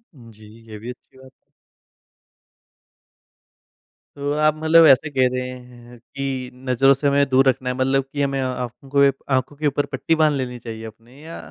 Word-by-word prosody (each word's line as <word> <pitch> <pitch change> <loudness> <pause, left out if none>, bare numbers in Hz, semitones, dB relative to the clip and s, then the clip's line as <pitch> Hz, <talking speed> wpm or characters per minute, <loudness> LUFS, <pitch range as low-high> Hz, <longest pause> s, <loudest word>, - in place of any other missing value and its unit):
जी, 115 -4 -16 0.2
ये 110 - -8
भी 115 +4 -8
अच्छी 125 +1 -13
बात। 130 0 -16 2.8
तो 145 0 -3
आप 155 0 +2
मतलब 160 +1 +5
ऐसे 140 +2 +4
कह 130 -3 +2
रहे 125 0 -3
हैं 125 -1 -13
कि 135 0 -5 0.2
नज़रों 135 +2 +4
से 140 +2 -1
हमें 140 0 +3
दूर 135 +1 +3
रखना 130 0 -2
है 125 - -2
मतलब 135 +1 +1
कि 145 - -2
हमें 140 -1 -1
आँखों 125 +1 -5
को 140 0 +5 0.2
आँखों 130 +2 -1
के 150 +1 -1
ऊपर 145 +1 0
पट्टी 165 - -1
बाँध 155 -1 +3
लेनी 125 -2 -4
चाहिए 115 -1 -8
अपनी 115 +6 -14
या 165 - -8
130 Hz, 170 wpm, -21 LUFS, 125-140 Hz, 2.8 s, मतलब